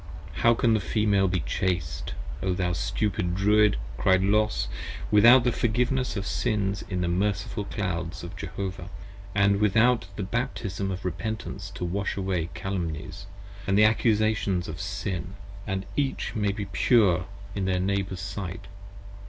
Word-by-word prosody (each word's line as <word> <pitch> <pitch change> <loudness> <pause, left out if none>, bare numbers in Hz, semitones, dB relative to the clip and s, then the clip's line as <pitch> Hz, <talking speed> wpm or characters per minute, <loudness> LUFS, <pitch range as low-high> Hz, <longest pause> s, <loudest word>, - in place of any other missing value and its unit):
How 115 0 +4
can 115 0 +3
the 110 - +3
Female 100 +1 +2
be 90 -2 0
Chaste, 85 +1 -2 0.3
O 95 -1 0
thou 90 -1 0
stupid 90 +1 -1
Druid, 105 - +4 0.2
Cried 95 0 +4
Los, 105 +2 +2 0.4
Without 120 +4 +8
the 125 - +2
Forgiveness 125 +2 0
of 100 - -3
Sins 100 -1 0
in 90 -2 -1
the 90 - 0
merciful 100 +3 -1
clouds 90 -6 -3
of 85 +3 -7
Jehovah, 95 +1 -5 0.5
And 100 0 +4
without 110 +1 +3
the 100 - -3
Baptism 100 -3 -2
of 95 0 -5
Repentance 100 0 -4
to 90 - -3
wash 100 +4 -2
away 95 -4 -1
Calumnies, 90 -2 -4 0.4
and 95 0 +3
The 105 - +7
Accusations 110 -4 +2
of 80 +3 -6
Sin, 95 -1 -4 0.3
that 95 -1 -2
each 140 -2 -1
may 105 -3 +1
be 100 0 -4
Pure 95 -3 +3 0.3
in 100 -2 -2
their 95 -1 +1
Neighbours' 95 -1 -1
sight? 95 -2 -5
100 Hz, 145 wpm, -27 LUFS, 90-105 Hz, 0.5 s, Without